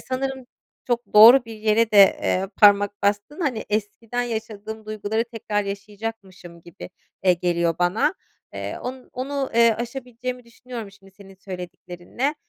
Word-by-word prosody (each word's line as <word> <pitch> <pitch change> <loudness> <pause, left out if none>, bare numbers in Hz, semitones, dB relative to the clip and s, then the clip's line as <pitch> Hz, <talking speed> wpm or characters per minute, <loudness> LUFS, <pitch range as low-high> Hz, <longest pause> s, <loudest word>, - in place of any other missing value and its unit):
sanırım 265 0 -4 0.4
çok 240 -4 -2
doğru 235 +4 +9
bir 225 -1 -9
yere 220 +1 +2
de, 205 - +4 0.2
eee, 190 +1 0
parmak 205 0 +4
bastın; 205 - -1
hani, 255 -9 -1
eskiden 220 +3 -2
yaşadığım 220 -2 -6
duyguları 215 +1 -2
tekrar 215 -3 -3
yaşayacakmışım 200 -4 -8
gibi, 170 +1 -11 0.3
eee, 180 - +6
geliyor 170 -1 0
bana. 200 - +1 0.4
Eee, - - -5
o 250 +1 -4 0.2
onu, 270 +1 -3
eee, 230 -1 +5
aşabileceğimi 250 0 -6
düşünüyorum 235 -2 -9
şimdi 195 -1 -19
senin 195 -1 -15
söylediklerinle. 180 - -5
220 Hz, 135 wpm, -23 LUFS, 200-245 Hz, 0.4 s, doğru